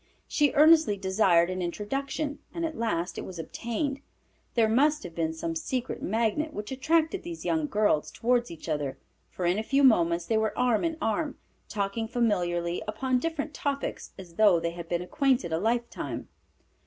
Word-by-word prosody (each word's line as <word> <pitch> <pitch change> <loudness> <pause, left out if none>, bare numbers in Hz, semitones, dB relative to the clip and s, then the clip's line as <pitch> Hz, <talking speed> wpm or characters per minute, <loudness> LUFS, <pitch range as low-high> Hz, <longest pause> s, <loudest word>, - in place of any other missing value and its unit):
She 295 -2 +2
earnestly 310 -7 +6
desired 190 -3 +3
an 185 0 -3
introduction, 275 - -3 0.2
and 335 -1 -1
at 320 -1 -4
last 185 - -2
it - - -5
was 185 - -8
obtained. 235 - -3 0.6
There 230 -2 +4
must 295 +7 +3
have 175 - -8
been 165 -1 -1
some 165 +1 -4
secret 255 +9 -3
magnet 230 +9 0
which 210 +3 -5
attracted 320 +7 +1
these 340 -1 -7
young 315 -2 +1
girls 205 - +1
toward 240 0 +1
each 165 0 -10
other, 150 -4 -2 0.3
for 180 - -4
in 180 +4 +2
a - - -2
few 275 +4 +2
moments 170 -9 +4
they 225 - +1
were 220 -1 -1
arm 245 -4 +2
in 330 -1 -1
arm, 280 +6 -1 0.3
talking 205 +2 -2
familiarly 175 -7 0
upon 250 +4 0
different 310 0 -3
topics 280 -4 -3
as 175 -3 -12
though 205 -6 +6
they 170 0 -2
had 170 -1 -8
been 175 0 -1
acquainted 255 - +1
a 160 - +1
lifetime. 235 +4 -2
220 Hz, 175 wpm, -28 LUFS, 175-280 Hz, 0.6 s, earnestly